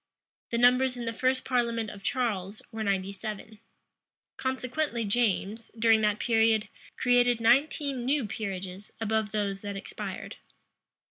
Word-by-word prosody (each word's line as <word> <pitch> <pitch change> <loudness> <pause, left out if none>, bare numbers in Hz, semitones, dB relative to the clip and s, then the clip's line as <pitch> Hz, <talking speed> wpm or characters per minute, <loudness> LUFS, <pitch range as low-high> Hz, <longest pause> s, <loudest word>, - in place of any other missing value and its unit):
The 235 - -1
numbers 250 +1 +4
in 240 - -4
the 230 - -2
first 255 +3 0
parliament 235 -3 0
of 200 - -11
Charles 210 -4 -2
were 220 -1 -3
ninety 195 -1 0
seven. 215 +1 -7 0.8
Consequently 260 -1 -2
James, 215 0 0
during 225 0 +5
that 210 -1 +2
period, 225 -2 +2 0.3
created 245 -1 +4
nineteen 270 +2 +2
new 270 0 +1
peerages 195 -2 -5
above 220 -1 0
those 200 -2 -1
that 200 -2 -5
expired. 195 - -6
225 Hz, 130 wpm, -28 LUFS, 205-245 Hz, 0.8 s, during